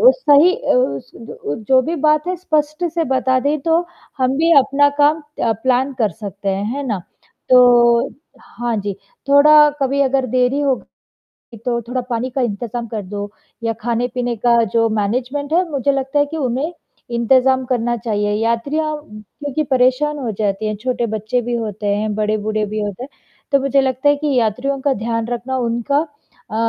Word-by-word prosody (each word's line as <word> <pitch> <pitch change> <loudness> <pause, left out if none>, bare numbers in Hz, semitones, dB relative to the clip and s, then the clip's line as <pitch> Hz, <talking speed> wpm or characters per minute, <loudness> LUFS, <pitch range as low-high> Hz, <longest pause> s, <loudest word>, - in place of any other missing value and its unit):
सही 315 -3 +5
अ, - - -11
ज 215 - -2
जो 260 -1 +5
भी 330 +5 -3
बात 305 +2 +3
है 365 - -1
स्पष्ट 310 -2 -1
से 335 -1 0
बता 260 0 +1
दे 290 +3 0
तो, 330 +1 +3 0.4
हम 260 +1 +1
भी 330 +2 +2
अपना 285 +2 +3
काम 300 +2 +4 0.2
अ, 230 - +2
प्लान 260 +1 +1
कर 215 -3 +2
सकते 200 -2 -6
हैं, 195 +1 -1
है 285 -1 -4
ना? 210 -5 -1 0.5
तो 240 -2 +5 0.3
हाँ 240 -1 -4
जी 200 -1 -3 0.4
थोड़ा 300 +1 +7
कभी 275 +1 +1
अगर 265 -1 +1
देरी 255 +3 +1
हो, 275 -2 +2 0.9
तो 240 -2 0
थोड़ा 245 +3 -3
पानी 240 +2 -2
का 265 - -3
इंतज़ाम 235 +1 -3
कर 215 -2 -4
दो, 205 +2 -6 0.3
या 230 0 0
खाने-पीने 245 +1 -1
का 235 +1 +3
जो 230 -1 +3
मैनेजमेंट 255 +8 -2
है 355 +1 +2
मुझे 280 0 0
लगता 270 +1 -1
है 290 - +3
कि 320 +2 -6
उन्हें 275 +4 -2 0.4
इंतज़ाम 260 +2 +3
करना 240 -1 0
चाहिए, 210 -2 -1
यात्रियाँ 285 +7 -1
क्योंकि 260 +8 -5
परेशान 260 +4 +2
हो 245 -5 -3
जाते 205 0 -1
हैं 215 -1 -2
छोटे 240 +1 -2
बच्चे 220 +4 -1
भी 240 +1 -3
होते 215 -2 -4
हैं, 215 0 -2
बड़े-बूढ़े 215 0 -1
भी 215 +1 -4
होते 205 +2 -4
हैं, - - -10 0.4
तो 275 - +4
मुझे 275 0 +2
लगता 265 +1 0
है 290 - +4
कि 295 -1 -1
यात्रियों 250 +5 -1
का 280 0 +1
ध्यान 230 -1 -1
रखना 245 +2 -3
उनका 240 +4 0 0.5
अ, 215 - -6
250 Hz, 175 wpm, -18 LUFS, 225-280 Hz, 0.9 s, थोड़ा